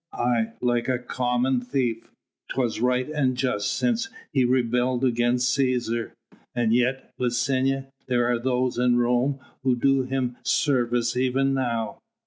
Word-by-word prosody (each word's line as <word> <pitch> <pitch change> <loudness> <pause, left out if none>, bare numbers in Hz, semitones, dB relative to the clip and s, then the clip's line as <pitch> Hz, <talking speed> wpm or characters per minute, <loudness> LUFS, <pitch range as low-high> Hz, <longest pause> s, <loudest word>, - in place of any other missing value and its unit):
"Aye! 120 -2 0
like 120 -1 +1
a 130 - +2
common 125 +1 0
thief. 125 -3 -2 0.4
'Twas 125 -5 -1
right 125 +1 +1
and 140 -5 0
just 105 -6 0
since 240 - 0 0.2
he 135 -2 +3
rebelled 125 0 +1
against 125 +1 +2
Cæsar." 125 -4 0 0.5
"And 120 -2 +2
yet, 125 +2 0
Licinia, 130 +2 0 0.2
there 120 -2 +2
are 120 -1 +1
those 125 0 0
in 125 -1 +3
Rome 125 +3 +1 0.2
who 130 -2 +2
do 135 +2 +2
him 130 -1 -2
service 120 -5 +1
even 130 +2 +1
now." 120 -4 -2
125 Hz, 135 wpm, -25 LUFS, 120-130 Hz, 0.5 s, he